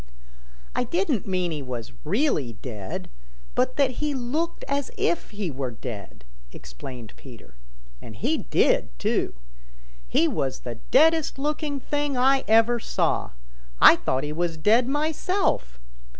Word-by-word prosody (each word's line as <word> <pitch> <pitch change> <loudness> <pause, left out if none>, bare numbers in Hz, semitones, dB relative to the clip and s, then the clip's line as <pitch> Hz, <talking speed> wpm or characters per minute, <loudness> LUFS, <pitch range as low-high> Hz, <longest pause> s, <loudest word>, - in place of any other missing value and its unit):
"I - - +1
didn't 290 - 0
mean 185 -2 0
he 150 -2 -3
was 125 - -6
really 185 - +1
dead, 105 -3 -6 0.5
but 255 - +1
that 275 -3 +3
he 300 -2 0
looked 295 +7 -2
as 280 -1 -1
if 400 -4 0
he 205 -5 -3
were 130 -1 -3
dead," 110 -3 -8 0.3
explained 110 - -9
Peter. 125 - -13 0.5
"And - - -10
he - - 0
did, - - +1
too. 60 - 0 0.7
He 165 - +3
was 135 -4 -2
the 120 -2 -6
deadest 320 -1 +4
looking 295 0 -2
thing 290 0 -1
I 265 +2 +4
ever 225 +2 +5
saw. - - -1 0.5
I - - +9
thought 130 +1 -1
he 150 0 -3
was 170 0 -1
dead 225 +9 +4
myself. 295 - 0
220 Hz, 135 wpm, -25 LUFS, -, 0.7 s, I